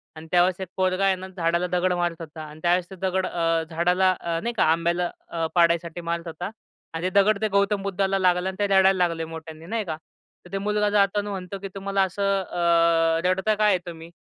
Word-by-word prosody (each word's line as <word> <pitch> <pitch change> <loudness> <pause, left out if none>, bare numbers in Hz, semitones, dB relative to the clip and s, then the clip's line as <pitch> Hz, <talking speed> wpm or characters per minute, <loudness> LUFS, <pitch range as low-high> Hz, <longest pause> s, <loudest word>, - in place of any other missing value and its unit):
आणि 155 +1 -10
त्यावेळेस 180 +1 +3
एक 190 - -4
पोरगा 185 +1 +1
आहे 195 -1 +3
ना, 185 +1 -8
झाडाला 170 +1 +1
दगड 180 +1 +1
मारत 175 -1 -1
होता 160 0 -8
आणि 155 0 -11
त्यावेळेस 175 +1 +2
ते 190 - -9
दगड 190 0 -1
अ, 165 -1 0
झाडाला 180 +3 +2
अ, 165 -1 -2
नाही 235 0 -2
का, - - +4
आंब्याला 170 +1 +1 0.2
अ, 165 -1 -2
पाडायसाठी 170 0 +2
मारत 170 0 -2
होता 165 +3 -5 0.4
आणि 165 +2 -4
ते 185 - +2
दगड 210 0 +1
ते 215 - +2
गौतम 200 0 +1
बुद्धाला 195 0 0
लागलं 180 0 +2
आणि 190 - -8
ते 205 - +2
रडायला 190 0 +5
लागले 165 -1 -4
मोठ्यांनी, 160 0 -9
नाही 220 +2 -2
का. 155 -2 -4 0.5
तर 180 - -15
ते 195 - -2
मुलगा 210 +1 0
जाताना 205 0 +1
म्हणतो, 190 0 -5
की 195 - -6
"तुम्हाला 195 0 -1
असं 200 +1 0
अ, 165 -2 +2
रडता 190 +4 +2
का 215 - 0
आहे 205 -3 +4
तुम्ही?" 165 -1 -9
180 Hz, 215 wpm, -24 LUFS, 170-195 Hz, 0.5 s, रडायला